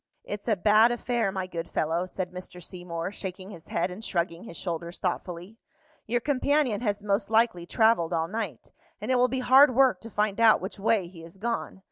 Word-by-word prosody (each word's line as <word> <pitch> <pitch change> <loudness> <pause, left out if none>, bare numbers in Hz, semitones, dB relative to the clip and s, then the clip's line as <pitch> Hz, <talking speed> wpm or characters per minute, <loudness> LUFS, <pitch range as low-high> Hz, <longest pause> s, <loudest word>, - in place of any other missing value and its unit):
"It's 205 +2 -6
a 220 - +3
bad 215 +5 +5
affair, 240 -3 -1
my 190 -1 -3
good 170 -2 -6
fellow," 165 +4 -1
said 185 -1 -4
Mr. 180 0 -9
Seymour, 175 -1 -5
shaking 190 -1 -7
his 170 -5 -12
head 170 +2 -1
and 200 +5 -8
shrugging 170 -1 -2
his 170 - -9
shoulders 170 -1 -4
thoughtfully. 180 +3 -4 0.5
"Your 240 +2 +1
companion 280 -4 +1
has 205 -3 -1
most 200 +1 0
likely 220 -6 +2
travelled 220 -7 +3
all 165 -1 0
night, 200 - -5 0.3
and 215 +5 -3
it - - +4
will 250 0 +4
be 260 +1 -2
hard 260 +1 +6
work 255 -8 +4
to 230 - -9
find 210 -1 -1
out 225 -1 +6
which 195 +2 -7
way 200 -2 +1
he 170 -1 -13
has 165 +3 -13
gone. 230 -2 -3
200 Hz, 200 wpm, -27 LUFS, 175-230 Hz, 0.5 s, hard